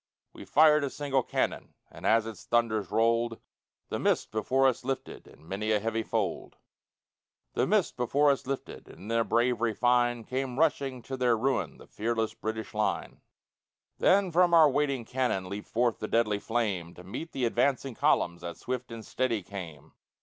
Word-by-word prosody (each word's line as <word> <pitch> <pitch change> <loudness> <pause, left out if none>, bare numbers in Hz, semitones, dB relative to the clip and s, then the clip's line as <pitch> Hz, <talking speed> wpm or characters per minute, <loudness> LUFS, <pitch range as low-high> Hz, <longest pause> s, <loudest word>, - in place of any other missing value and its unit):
We - - -11
fired 155 0 +5
a 140 - -1
single 135 -1 0
cannon, - - -2 0.2
And - - -5
as 115 0 +4
its 115 -1 -8
thunders 115 -3 0
rolled, 115 0 +1 0.5
The - - -2
mist - - +1
before 130 +5 +1
us 130 -2 0
lifted 135 +1 -5
In 80 - -18
many 100 +4 -3
a 105 - +3
heavy 115 +2 -1
fold - - -3 1.0
The - - +1
mist - - +1
before 140 +4 +3
us 135 - -3
lifted 135 0 -5
And - - -14
in 100 - -10
their 115 0 +2
bravery 120 -1 +1
fine 120 -1 +2
Came 130 +1 -3
rushing 140 -5 0
to 130 +2 -5
their 125 -2 +2
ruin 130 +4 -1
The - - -14
fearless 110 0 -2
British 110 -1 -5
line. 105 0 -2 0.8
Then 190 -1 +4
from 175 0 +4
our 155 -3 +7
waiting 140 -4 0
cannon 125 -7 -1
Leaped 100 +2 -6
forth 120 0 0
the 110 - -4
deadly 110 -3 +1
flame, 100 -8 -2
To 90 - -12
meet 130 - -7
the 130 - -1
advancing 130 +2 +1
columns 85 -5 +1
That 85 -1 -6
swift 125 -1 -5
and 115 -2 -8
steady 120 -6 -1
came. 85 -7 -9
120 Hz, 175 wpm, -29 LUFS, 110-130 Hz, 1.0 s, our